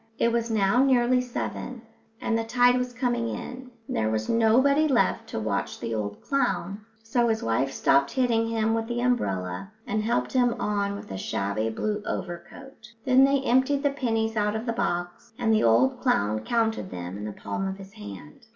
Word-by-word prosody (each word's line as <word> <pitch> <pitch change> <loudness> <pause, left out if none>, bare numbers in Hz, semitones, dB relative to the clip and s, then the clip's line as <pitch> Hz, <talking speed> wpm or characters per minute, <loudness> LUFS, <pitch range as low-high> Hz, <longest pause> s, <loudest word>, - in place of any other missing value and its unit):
It 235 - +2
was 235 0 0
now 220 +3 +3
nearly 250 -1 +3
seven, 250 0 -5 0.4
and 225 - -1
the 225 - 0
tide 245 +2 +4
was 250 0 -1
coming 240 -1 -1
in, 255 0 -7 0.2
and - - -4
there 110 -1 +1
was 110 0 -2
nobody 260 +7 +4
left 260 -5 +1
to - - -3
watch 105 -2 -2
the 115 -1 -4
old 105 -2 -4
clown, 210 -7 -1 0.2
so 235 +1 +1
his 220 -1 0
wife 125 +4 0
stopped 140 0 +3
hitting 235 -3 +1
him 225 -1 +1
with 225 0 -1
the 240 0 -2
umbrella 145 - -1
and 215 +1 -1
helped 230 +3 -1
him 245 -2 +3
on 200 -1 -1
with 200 - -9
a 95 - -4
shabby 100 +4 -1
blue 210 - -2
overcoat. 205 +8 -7
Then 260 +1 +6
they 275 0 +2
emptied 265 +2 +2
the 285 - +3
pennies 225 -5 -1
out 210 0 +1
of 220 +2 -3
the 230 - -1
box, 175 -2 -3
and 225 -2 +2
the 215 - +3
old 115 +3 +3
clown 105 +2 +1
counted 225 - -1
them 90 0 -6
in 105 +1 -6
the 105 - -4
palm 185 - -4
of 190 0 -4
his 195 0 -12
hand. 100 -7 -11
225 Hz, 195 wpm, -26 LUFS, -, 0.4 s, Then